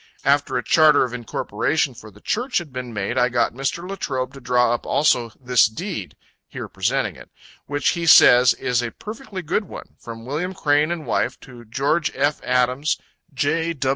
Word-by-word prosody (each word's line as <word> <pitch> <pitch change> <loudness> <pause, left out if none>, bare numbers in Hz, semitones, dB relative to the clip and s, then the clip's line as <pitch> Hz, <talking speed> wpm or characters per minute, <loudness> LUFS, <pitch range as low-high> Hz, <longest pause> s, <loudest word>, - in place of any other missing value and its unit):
After 140 -1 +2
a 125 - -2
charter 155 +5 +5
of 125 -2 -4
incorporation 125 +4 -1
for 110 -2 -12
the 105 0 -19
Church 250 +4 -1
had 165 -7 -4
been 125 -1 -5
made, 100 -3 -2
I 125 - +3
got 120 -1 +1
Mr. 135 +7 -3
Latrobe 135 -9 -3
to 135 - -11
draw 125 -1 +2
up 120 - -3
also 125 -6 +1
this 125 -4 +4
deed, 110 - -6 0.3
[here - - -7
presenting - - -1
it] - - -14 0.4
which 145 +1 0
he 170 -1 -2
says 125 -5 +7
is 125 -1 0
a 120 - -3
perfectly 210 - -8
good 180 +7 -1
one - - -11
from 115 -1 -9
William 165 +8 -3
Crane 150 -2 +2
and 170 -3 -4
wife, - - -1
to 120 -3 -13
Geo. 140 +9 0
F. 145 +2 0
Adams, 125 +4 +1 0.3
J. 160 +5 -1
135 Hz, 180 wpm, -22 LUFS, 120-160 Hz, 0.4 s, says